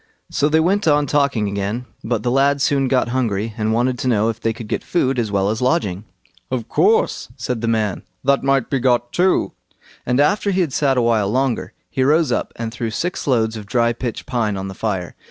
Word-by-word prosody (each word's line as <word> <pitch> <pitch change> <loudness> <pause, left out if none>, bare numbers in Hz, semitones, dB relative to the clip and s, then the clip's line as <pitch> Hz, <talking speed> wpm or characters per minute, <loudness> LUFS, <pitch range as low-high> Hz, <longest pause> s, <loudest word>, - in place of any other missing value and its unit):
So 145 - +1
they 160 +1 +3
went 190 +4 +1
on 145 -1 +4
talking 140 -7 +1
again, 100 +5 -3 0.2
but 115 -2 -1
the 120 - 0
lad 140 +2 +3
soon 135 -1 +2
got 125 -2 +1
hungry, 115 -4 -1
and 110 -1 -1
wanted 125 +2 +1
to - - -2
know 110 -2 +2
if 115 0 -5
they 115 - +1
could 115 0 -8
get - - -2
food 135 -7 0
as 110 -3 -1
well 100 0 +1
as 110 - -3
lodging. 110 - 0 0.4
"Of 120 -3 -3
course", 450 +4 +2
said 125 -3 -3
the 115 - -1
man, 110 -4 0 0.2
"that 140 +1 +3
might 135 -2 +1
be 135 - 0
got 120 -1 +1
too." 185 +1 +2 0.5
And 125 +2 0
after 200 +7 +2
he 190 -1 +1
had 160 -7 -1
sat 135 -2 +2
a 125 - +3
while 110 -4 +2
longer, 130 +2 -1
he 130 - -3
rose 150 0 +3
up - - -1
and 115 -1 -4
threw 120 -1 -3
six 175 +11 -3
loads 115 -4 +1
of 105 -2 -8
dry 120 +1 +2
pitch 120 -1 -5
pine 115 -6 -1
on 95 0 -4
the - - -7
fire. 95 -4 -3
120 Hz, 225 wpm, -20 LUFS, 110-140 Hz, 0.5 s, on